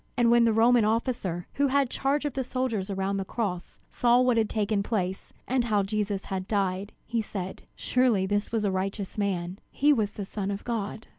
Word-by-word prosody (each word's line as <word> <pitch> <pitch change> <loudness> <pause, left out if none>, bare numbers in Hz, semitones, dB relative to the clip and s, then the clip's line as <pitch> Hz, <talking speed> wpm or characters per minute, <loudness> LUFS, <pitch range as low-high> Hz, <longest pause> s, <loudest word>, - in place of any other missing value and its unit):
And 235 -1 +4
when 235 0 +6
the 230 - +4
Roman 230 +1 +5
officer, 215 -6 -1
who 285 0 +2
had 275 -1 +2
charge 280 +2 0
of 290 - -1
the 265 - -1
soldiers 245 -6 -2
around 195 0 -1
the 195 - -1
cross, 190 -3 -4
saw 240 0 +4
what 250 -1 +3
had 225 -2 +2
taken 210 -1 0
place, 190 -3 -2 0.2
and 250 -1 +1
how 210 -3 +2
Jesus 205 -1 -2 0.2
died, 195 -1 -1
he 230 -1 -1
said: 190 -3 -6
"Surely 245 -7 +2
this 205 +1 -1
was 225 -2 0
a 200 - +1
righteous 195 +1 -3
man; 190 -2 -2
he 295 +2 +3
was 215 -6 0
the 200 - -5
Son 200 0 -4
of 200 0 -4
God." 220 -2 -3
215 Hz, 200 wpm, -27 LUFS, 195-240 Hz, 0.2 s, when